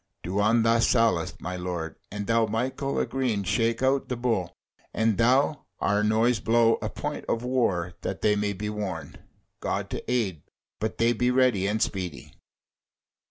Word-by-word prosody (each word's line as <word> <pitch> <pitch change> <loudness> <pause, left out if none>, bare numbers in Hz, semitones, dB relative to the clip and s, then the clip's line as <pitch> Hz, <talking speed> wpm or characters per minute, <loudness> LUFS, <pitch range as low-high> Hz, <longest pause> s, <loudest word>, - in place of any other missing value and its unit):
Do 95 +3 -2
on 110 +2 +3
thy 115 0 +4
sallet, 115 -7 +2
my 90 +1 -4
lord; 90 -3 -4
and 105 0 -5
thou, 115 0 +2
Michael 130 +5 -2
a - - +2
green 125 -7 -1
shake 115 +5 0
out 135 +1 +2
the 125 - -1
Bull; 115 -8 -1 0.4
and 110 -1 +2
thou, 135 +5 +3
our 105 +1 +1
Noise, 110 +2 +3
blow 115 +1 +3
a - - -2
point - - -5
of 115 - 0
war 100 -9 0
that 95 - -4
they 105 -1 +4
may 105 0 0
be 105 +2 -5
warned. 105 -2 -5 0.4
God - - -3
to - - -4
aid! 100 - 0 0.4
but 110 +1 -3
they 115 +1 +3
be 125 +2 +1
ready 125 -7 +3
and 105 +2 0
speedy!" 90 -6 -4
110 Hz, 170 wpm, -26 LUFS, 100-120 Hz, 0.4 s, thy